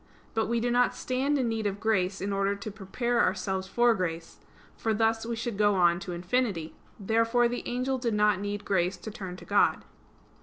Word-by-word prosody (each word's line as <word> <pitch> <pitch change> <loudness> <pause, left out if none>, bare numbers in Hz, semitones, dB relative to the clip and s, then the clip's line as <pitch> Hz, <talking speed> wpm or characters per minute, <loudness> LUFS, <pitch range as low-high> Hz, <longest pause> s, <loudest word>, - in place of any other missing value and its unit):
But 225 -1 0
we 235 +1 +1
do 240 +1 0
not 245 +1 +3
stand 270 +3 0
in 255 -3 0
need 225 -2 -1
of 200 0 -3
grace 195 -3 0
in 200 +1 -2
order 195 0 +1
to 200 +2 -7
prepare 235 +4 -1
ourselves 190 0 0
for 240 +4 +3
grace: 170 -4 -4 0.4
for 220 -1 -1
thus 225 +1 +1
we 235 - -2
should 225 -2 -4
go 205 -1 +4
on 175 -2 +4
to 185 - -6
infinity. 175 -1 -1 0.3
Therefore 230 +4 +2
the 245 +1 -3
angel 255 +2 -1
did 235 -3 -1
not 210 -2 +3
need 205 0 -4
grace 185 -1 +1
to 215 +5 -8
turn 190 -5 -7
to - - -12
God. - - +2
210 Hz, 200 wpm, -28 LUFS, 190-235 Hz, 0.4 s, go